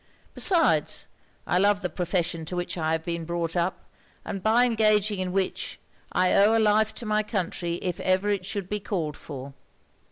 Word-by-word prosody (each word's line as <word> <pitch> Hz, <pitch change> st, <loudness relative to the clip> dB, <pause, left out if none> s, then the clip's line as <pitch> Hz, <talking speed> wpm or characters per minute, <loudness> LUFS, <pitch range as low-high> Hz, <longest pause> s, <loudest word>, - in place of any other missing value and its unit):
Besides, 350 Hz, -4 st, +3 dB, 0.4 s
I 180 Hz, -, +1 dB
love 200 Hz, 0 st, +2 dB
the -, -, +1 dB
profession 175 Hz, -1 st, -1 dB
to 180 Hz, -, -5 dB
which 175 Hz, 0 st, -3 dB
I 160 Hz, -2 st, 0 dB
have 160 Hz, 0 st, -1 dB
been 170 Hz, 0 st, -3 dB
brought 170 Hz, 0 st, -3 dB
up, 175 Hz, +1 st, -1 dB, 0.4 s
and, 195 Hz, -, -4 dB
by 225 Hz, +5 st, +4 dB
engaging 215 Hz, -3 st, +2 dB
in 185 Hz, -1 st, -2 dB
which, 190 Hz, 0 st, -2 dB, 0.3 s
I 185 Hz, 0 st, +2 dB
owe 210 Hz, +3 st, +5 dB
a -, -, +3 dB
life 215 Hz, 0 st, +3 dB
to 235 Hz, -, -6 dB
my 215 Hz, 0 st, +2 dB
country 180 Hz, -5 st, -2 dB
if 180 Hz, -2 st, -2 dB
ever 185 Hz, +2 st, +1 dB
it 200 Hz, -2 st, -1 dB
should 195 Hz, 0 st, -3 dB
be 210 Hz, +1 st, -2 dB
called 170 Hz, -7 st, -3 dB
for.' 135 Hz, -2 st, -9 dB
185 Hz, 185 wpm, -26 LUFS, 170-210 Hz, 0.4 s, owe